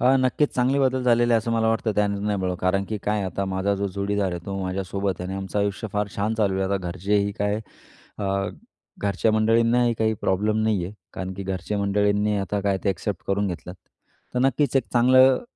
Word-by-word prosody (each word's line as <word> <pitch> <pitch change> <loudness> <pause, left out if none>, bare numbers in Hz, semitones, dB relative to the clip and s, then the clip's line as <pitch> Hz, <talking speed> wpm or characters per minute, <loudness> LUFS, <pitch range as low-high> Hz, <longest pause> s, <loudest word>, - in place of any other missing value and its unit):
अ, 130 +2 +5
नक्कीच 130 +3 +1
चांगले 130 +3 +2
बदल 130 -1 +2
झालेले 120 -1 +3
आहे - - +5
असं 115 +1 -3
मला 110 -1 +2
वाटतं, 110 0 +1
त्याने 100 -1 +1
नाही 105 -1 0
बळं. 90 -1 -1
कारण 95 +2 +1
की 110 - -3
काय 105 0 0
आता 95 +1 -2
माझा 95 +1 0
जो 100 0 -2
जोडीदार 100 -1 0
आहे, 85 - -4
तो 100 0 -3
माझ्यासोबत 95 0 -2
आहे 90 - -4
आणि 95 - -4
आमचं 95 +1 -3
आयुष्य 100 +2 -1
फार 105 -1 0
छान 105 +2 0
चालू 105 -3 +1
आहे. 95 - +1
आता - - +3
घरचेही 100 +3 0
काय 105 +1 0 0.6
अ, 105 - -3 0.7
घरच्या 100 +2 +1
मंडळींनाही 115 +2 +3
काही 110 0 +1
प्रॉब्लेम 105 +3 +1
नाही 105 -5 +1
आहे. 90 - -6 0.2
कारण 95 0 -5
की 100 - -6
घरच्या 95 +2 -3
मंडळींनी 105 +1 +1
आता 100 +1 -2
काय 100 -1 0
ते - - +2
एक्सेप्ट 95 -1 -4
करून 100 +1 +1
घेतलत. 90 -1 -6 0.6
तर - - +1
नक्कीच 135 +2 +2
एक 130 - +2
चांगलं 130 +2 +5
105 Hz, 210 wpm, -24 LUFS, 95-115 Hz, 0.7 s, अ